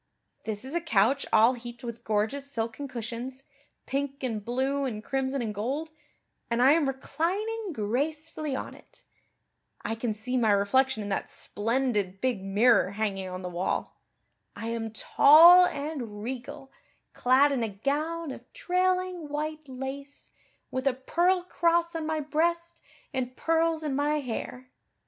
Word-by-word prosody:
This 215 Hz, +2 st, -2 dB
is 265 Hz, -, -5 dB
a 345 Hz, -, 0 dB
couch 265 Hz, -1 st, +2 dB
all 230 Hz, +4 st, +6 dB
heaped 240 Hz, 0 st, -9 dB
with 235 Hz, -1 st, -7 dB
gorgeous 220 Hz, +7 st, -1 dB
silken 230 Hz, +3 st, -3 dB
cushions, 250 Hz, +2 st, -6 dB, 0.4 s
pink 275 Hz, 0 st, -3 dB
and 225 Hz, -5 st, -2 dB
blue 265 Hz, +5 st, -1 dB
and 220 Hz, -5 st, -3 dB
crimson 265 Hz, 0 st, -1 dB
and 215 Hz, -2 st, -3 dB
gold, 270 Hz, +10 st, -3 dB, 0.6 s
and 235 Hz, 0 st, 0 dB
I 260 Hz, +3 st, +6 dB
am 310 Hz, -2 st, +3 dB
reclining 385 Hz, +11 st, -2 dB
gracefully 300 Hz, +5 st, -2 dB
on -, -, -5 dB
it. -, -, -15 dB, 0.8 s
I -, -, -2 dB
can 225 Hz, 0 st, -2 dB
see 250 Hz, +4 st, -2 dB
my 230 Hz, -3 st, +3 dB
reflection 220 Hz, +4 st, +2 dB
in 205 Hz, -, -5 dB
that 195 Hz, -, -2 dB
splendid 210 Hz, -4 st, -1 dB
big 245 Hz, -6 st, -1 dB
mirror 200 Hz, +1 st, +3 dB
hanging 200 Hz, -3 st, -2 dB
on 185 Hz, 0 st, -6 dB
the -, -, -3 dB
wall. 180 Hz, +1 st, -3 dB, 0.5 s
I 225 Hz, -, -5 dB
am 230 Hz, -1 st, -3 dB
tall 335 Hz, +10 st, +7 dB
and 275 Hz, -10 st, -5 dB
regal, 265 Hz, +3 st, -6 dB, 0.4 s
clad 265 Hz, +3 st, +4 dB
in 270 Hz, -3 st, 0 dB
a 225 Hz, -, 0 dB
gown 295 Hz, +9 st, -2 dB
of -, -, -11 dB
trailing 365 Hz, -2 st, 0 dB
white 305 Hz, 0 st, -4 dB
lace, 270 Hz, +2 st, -7 dB, 0.4 s
with 260 Hz, +1 st, -2 dB
a 265 Hz, -, +2 dB
pearl 350 Hz, +7 st, +1 dB
cross 340 Hz, -1 st, +1 dB
on 320 Hz, -1 st, -3 dB
my 315 Hz, -1 st, -1 dB
breast 335 Hz, +3 st, -1 dB, 0.3 s
and 255 Hz, -1 st, -3 dB
pearls 325 Hz, -1 st, +1 dB
in 290 Hz, -3 st, -1 dB
my 295 Hz, +2 st, +1 dB
hair. 255 Hz, 0 st, -6 dB
265 Hz, 150 wpm, -28 LUFS, 230-310 Hz, 0.8 s, tall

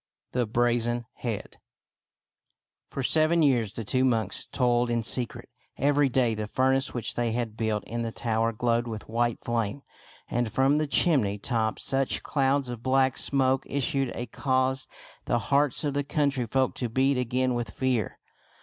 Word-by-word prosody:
THE 125 Hz, -2 st, 0 dB
BRAZEN 120 Hz, +1 st, +1 dB
HEAD 115 Hz, -5 st, -5 dB, 1.3 s
For 135 Hz, -, -4 dB
seven 160 Hz, +4 st, +3 dB
years 120 Hz, -7 st, +2 dB
the 115 Hz, -, -5 dB
two 130 Hz, +5 st, +1 dB
monks 115 Hz, -4 st, 0 dB
toiled 120 Hz, -1 st, +1 dB
in 120 Hz, -1 st, 0 dB
secret. 120 Hz, +1 st, -3 dB, 0.3 s
Every 145 Hz, 0 st, +3 dB
day 125 Hz, -2 st, +2 dB
the 105 Hz, -1 st, -4 dB
furnace 130 Hz, +3 st, +1 dB
which 115 Hz, -1 st, -3 dB
they 120 Hz, -1 st, -1 dB
had 115 Hz, -2 st, -2 dB
built 110 Hz, -2 st, -1 dB
in 120 Hz, +1 st, -4 dB
the 115 Hz, -1 st, -2 dB
tower 115 Hz, 0 st, 0 dB
glowed 120 Hz, +1 st, 0 dB
with 110 Hz, -2 st, -6 dB
white 120 Hz, +1 st, -1 dB
flame, 120 Hz, +3 st, -2 dB, 0.4 s
and 120 Hz, -2 st, -1 dB
from 135 Hz, +5 st, +3 dB
the 155 Hz, 0 st, 0 dB
chim 150 Hz, 0 st, +4 dB
ney 100 Hz, -1 st, -2 dB
top 110 Hz, +1 st, -1 dB
such 135 Hz, 0 st, 0 dB
clouds 140 Hz, -1 st, +1 dB
of 120 Hz, -2 st, -6 dB
black 130 Hz, +1 st, +2 dB
smoke 135 Hz, -1 st, +1 dB
issued 135 Hz, -1 st, 0 dB
as 120 Hz, -, -5 dB
caused 130 Hz, 0 st, 0 dB, 0.4 s
the 120 Hz, -, +1 dB
hearts 140 Hz, +4 st, +1 dB
of 145 Hz, -2 st, -1 dB
the 145 Hz, 0 st, 0 dB
country 140 Hz, -4 st, 0 dB
folk 130 Hz, +3 st, +1 dB
to 120 Hz, -, -2 dB
beat 130 Hz, +3 st, +2 dB
again 125 Hz, +1 st, 0 dB
with 120 Hz, -3 st, -2 dB
fear. 125 Hz, -3 st, -1 dB
125 Hz, 165 wpm, -27 LUFS, 115-135 Hz, 1.3 s, chim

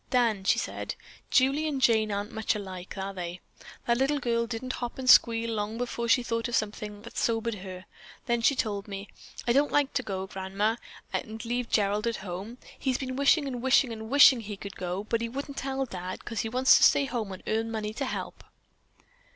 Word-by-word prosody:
"Dan," 230 Hz, -6 st, +2 dB
she -, -, +4 dB
said, -, -, -4 dB, 0.3 s
"Julie 275 Hz, +4 st, +3 dB
and 285 Hz, -3 st, -1 dB
Jane 220 Hz, -4 st, +3 dB
aren't 205 Hz, +1 st, -3 dB
much 220 Hz, -1 st, 0 dB
alike, 190 Hz, -2 st, -7 dB
are 195 Hz, +1 st, -4 dB
they? 180 Hz, -1 st, -5 dB, 0.5 s
That 235 Hz, 0 st, +2 dB
little 275 Hz, +2 st, +2 dB
girl 235 Hz, -3 st, 0 dB
didn't 245 Hz, +2 st, -4 dB
hop 240 Hz, -1 st, -5 dB
and 260 Hz, -1 st, -5 dB
squeal 230 Hz, -2 st, +6 dB
long 215 Hz, +1 st, -2 dB
before 235 Hz, -1 st, -3 dB
she 245 Hz, +2 st, +4 dB
thought 230 Hz, 0 st, -1 dB
of 240 Hz, -, -1 dB
something 210 Hz, -1 st, -3 dB
that 235 Hz, -, -10 dB
sobered 230 Hz, 0 st, 0 dB
her. 185 Hz, -2 st, -8 dB, 0.4 s
Then 235 Hz, -2 st, +1 dB
she 275 Hz, +4 st, +4 dB
told 205 Hz, -4 st, -2 dB
me, 200 Hz, 0 st, -7 dB, 0.4 s
'I 235 Hz, -, +4 dB
don't 285 Hz, +3 st, +3 dB
like 290 Hz, -1 st, +2 dB
to 255 Hz, -, +1 dB
go, 190 Hz, -5 st, -4 dB
Grandma, 195 Hz, +4 st, -1 dB, 0.4 s
and 220 Hz, +1 st, -4 dB
leave 240 Hz, 0 st, -2 dB
Gerald 210 Hz, +1 st, +1 dB
at 230 Hz, -, 0 dB
home. 195 Hz, +6 st, -6 dB, 0.2 s
He's 260 Hz, -2 st, 0 dB
been 255 Hz, -1 st, -4 dB
wishing 280 Hz, +2 st, +4 dB
and 250 Hz, -3 st, -4 dB
wishing 260 Hz, -1 st, +3 dB
and 220 Hz, 0 st, -7 dB
wishing 280 Hz, -2 st, +7 dB
he 210 Hz, -2 st, -6 dB
could 200 Hz, 0 st, -8 dB
go, 180 Hz, +2 st, -3 dB
but 225 Hz, +2 st, -1 dB
he 230 Hz, -, -2 dB
wouldn't 280 Hz, +3 st, -6 dB
tell 270 Hz, 0 st, -2 dB
Dad 185 Hz, -5 st, -7 dB
'cause 225 Hz, -3 st, -4 dB
he 225 Hz, -, -1 dB
wants 255 Hz, +3 st, +6 dB
to -, -, +2 dB
stay 280 Hz, -, +6 dB
home 230 Hz, -6 st, -3 dB
and 185 Hz, -, -8 dB
earn 225 Hz, +1 st, 0 dB
money 215 Hz, -1 st, -3 dB
to 275 Hz, -, -3 dB
help.'" -, -, -5 dB
230 Hz, 210 wpm, -28 LUFS, 205-255 Hz, 0.5 s, wishing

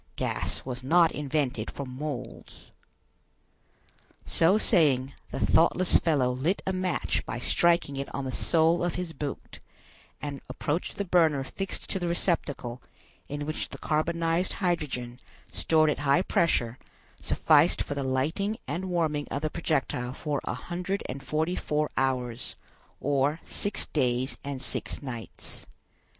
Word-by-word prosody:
Gas -, -, -2 dB
was 125 Hz, -1 st, -4 dB
not 165 Hz, +5 st, +5 dB
invented 145 Hz, -2 st, -1 dB
for 140 Hz, -, -5 dB
moles." 130 Hz, -1 st, -7 dB, 1.5 s
So 175 Hz, +5 st, +4 dB
saying, 140 Hz, -, +3 dB, 0.2 s
the -, -, -4 dB
thoughtless 175 Hz, +2 st, +4 dB
fellow 140 Hz, -6 st, +2 dB
lit 145 Hz, +10 st, 0 dB
a 190 Hz, -, 0 dB
match 185 Hz, -2 st, 0 dB
by -, -, -4 dB
striking 170 Hz, -5 st, +2 dB
it 140 Hz, -, -3 dB
on 140 Hz, -, -3 dB
the 130 Hz, -, -2 dB
sole 165 Hz, +4 st, +3 dB
of 175 Hz, -2 st, 0 dB
his 180 Hz, -2 st, -3 dB
boot; 145 Hz, -1 st, -5 dB, 0.6 s
and 145 Hz, -2 st, -5 dB
approached 155 Hz, +4 st, -2 dB
the 200 Hz, -, -1 dB
burner 160 Hz, -6 st, +4 dB
fixed 195 Hz, +8 st, -5 dB
to 190 Hz, -, 0 dB
the 175 Hz, -, -1 dB
receptacle, 145 Hz, -8 st, -1 dB, 0.5 s
in 145 Hz, 0 st, -3 dB
which 155 Hz, +1 st, -3 dB
the -, -, -7 dB
carbonized 165 Hz, +3 st, +1 dB
hydrogen, 140 Hz, -9 st, -1 dB, 0.3 s
stored 155 Hz, -1 st, +3 dB
at -, -, -3 dB
high 145 Hz, +5 st, +3 dB
pressure, 125 Hz, -11 st, +1 dB, 0.4 s
sufficed 155 Hz, +2 st, +4 dB
for -, -, -4 dB
the 140 Hz, -, -2 dB
lighting 155 Hz, +11 st, 0 dB
and 185 Hz, +3 st, -2 dB
warming 160 Hz, -5 st, 0 dB
of 145 Hz, -, -3 dB
the 155 Hz, -, 0 dB
projectile 135 Hz, -6 st, -1 dB
for 145 Hz, 0 st, -2 dB
a -, -, -2 dB
hundred 180 Hz, +8 st, -3 dB
and 135 Hz, +2 st, -5 dB
forty 155 Hz, +5 st, 0 dB
four 150 Hz, 0 st, 0 dB
hours, 125 Hz, -3 st, -1 dB, 0.4 s
or 145 Hz, +3 st, +1 dB
six 205 Hz, -, -2 dB
days 130 Hz, -2 st, 0 dB
and 140 Hz, -2 st, -4 dB
six -, -, -3 dB
nights. 120 Hz, -4 st, -7 dB
150 Hz, 140 wpm, -28 LUFS, 135-170 Hz, 1.5 s, not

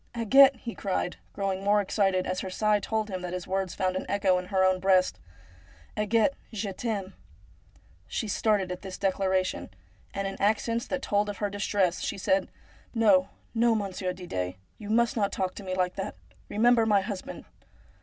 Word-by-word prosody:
' -, -, -18 dB
Agathe,' 270 Hz, +4 st, +6 dB
he 235 Hz, -2 st, -7 dB
cried, 185 Hz, -2 st, -2 dB
growing 195 Hz, -1 st, -2 dB
more 205 Hz, +1 st, +4 dB
excited 195 Hz, -2 st, +1 dB
as 185 Hz, 0 st, -2 dB
her 190 Hz, -, -4 dB
sigh 210 Hz, +2 st, +2 dB
told 220 Hz, +1 st, -2 dB
him 185 Hz, -3 st, -4 dB
that 180 Hz, -1 st, -5 dB
his 180 Hz, -1 st, -4 dB
words 190 Hz, -1 st, -2 dB
found 185 Hz, -1 st, 0 dB
an 185 Hz, -, -3 dB
echo 195 Hz, -2 st, +2 dB
in 180 Hz, -, -7 dB
her 190 Hz, 0 st, +1 dB
own 185 Hz, 0 st, +3 dB
breast, 185 Hz, -1 st, +3 dB, 0.4 s
' 80 Hz, -2 st, -26 dB
Agathe, 220 Hz, +6 st, +2 dB, 0.2 s
je 205 Hz, -3 st, -3 dB
t'aime! 200 Hz, -3 st, -3 dB, 0.3 s
' -, -, -30 dB
' -, -, -34 dB, 0.2 s
She 225 Hz, -, -3 dB
started 200 Hz, -2 st, +1 dB
at 180 Hz, -, -5 dB
this 190 Hz, -1 st, -7 dB
declaration, 190 Hz, -, 0 dB, 0.4 s
and 195 Hz, 0 st, -2 dB
in 195 Hz, -, -6 dB
accents 225 Hz, +3 st, +1 dB
that 275 Hz, -1 st, -3 dB
told 205 Hz, 0 st, +1 dB
of 205 Hz, -, -5 dB
her 205 Hz, -1 st, -2 dB
distress 200 Hz, -3 st, 0 dB
she -, -, -3 dB
said: 190 Hz, 0 st, +1 dB, 0.2 s
' -, -, -28 dB
No, 195 Hz, -3 st, +5 dB, 0.2 s
no, 235 Hz, 0 st, +3 dB
Monsieur 195 Hz, -3 st, -2 dB
Didet; 95 Hz, -, -4 dB, 0.2 s
you 210 Hz, -1 st, -8 dB
must 235 Hz, +2 st, +2 dB
not 205 Hz, -3 st, +1 dB
talk 185 Hz, -1 st, -2 dB
to 205 Hz, -, -9 dB
me 185 Hz, -1 st, -3 dB
like 180 Hz, -1 st, 0 dB
that. 195 Hz, -, -4 dB, 0.3 s
Eemember 230 Hz, +1 st, +4 dB
my 205 Hz, -2 st, +4 dB
husband 195 Hz, -1 st, -6 dB
195 Hz, 195 wpm, -28 LUFS, 185-215 Hz, 0.4 s, Agathe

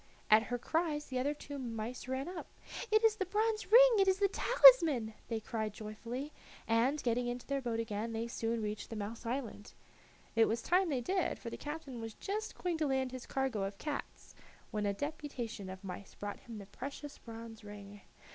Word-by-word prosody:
At 215 Hz, +1 st, +9 dB
her 245 Hz, -, 0 dB
cries 305 Hz, +3 st, 0 dB
the 255 Hz, -1 st, -2 dB
other 285 Hz, +3 st, 0 dB
two 285 Hz, -1 st, -7 dB
mice 235 Hz, 0 st, -5 dB
ran 260 Hz, +3 st, -2 dB
up. 360 Hz, -2 st, -6 dB, 0.4 s
"It 435 Hz, +1 st, +5 dB
is 445 Hz, -1 st, +5 dB
the 385 Hz, -, 0 dB
bronze 430 Hz, +2 st, 0 dB
ring! -, -, +9 dB
It 390 Hz, -, +5 dB
is 380 Hz, 0 st, +4 dB
the 400 Hz, 0 st, +4 dB
talisman!" 330 Hz, -, +7 dB
they 225 Hz, -2 st, -1 dB
cried 220 Hz, -1 st, -3 dB
joyfully, 230 Hz, +7 st, -6 dB, 0.3 s
and, 240 Hz, +6 st, +2 dB
getting 245 Hz, 0 st, +1 dB
into 245 Hz, 0 st, -4 dB
their 275 Hz, -1 st, -1 dB
boat 235 Hz, -3 st, -2 dB
again, 225 Hz, 0 st, -2 dB
they 225 Hz, +1 st, -2 dB
soon 230 Hz, -1 st, -2 dB
reached 210 Hz, 0 st, -4 dB
the 225 Hz, -, -5 dB
mouse 215 Hz, +2 st, -5 dB
island. 235 Hz, -4 st, -4 dB, 0.6 s
It 225 Hz, 0 st, +6 dB
was 225 Hz, +1 st, -1 dB
time 365 Hz, +1 st, +3 dB
they 265 Hz, -4 st, 0 dB
did, 370 Hz, +9 st, 0 dB
for 230 Hz, -, -7 dB
the -, -, -4 dB
captain 295 Hz, -5 st, -6 dB
was 225 Hz, -1 st, -6 dB
just 425 Hz, +2 st, -4 dB
going 350 Hz, -3 st, -1 dB
to 305 Hz, -, +2 dB
land 265 Hz, -1 st, 0 dB
his 255 Hz, -1 st, -7 dB
cargo 265 Hz, -6 st, -1 dB
of 195 Hz, +1 st, -4 dB
cats, 295 Hz, +4 st, -5 dB, 0.4 s
when 210 Hz, -1 st, 0 dB
a 200 Hz, -, +1 dB
deputation 255 Hz, -7 st, -4 dB
of 190 Hz, +1 st, -8 dB
mice 190 Hz, +1 st, -7 dB
brought 205 Hz, 0 st, -5 dB
him 230 Hz, -2 st, -9 dB
the 200 Hz, -, -8 dB
precious 280 Hz, +7 st, -7 dB
bronze 225 Hz, -1 st, -9 dB
ring. 205 Hz, -1 st, -10 dB
245 Hz, 200 wpm, -34 LUFS, 220-300 Hz, 0.6 s, At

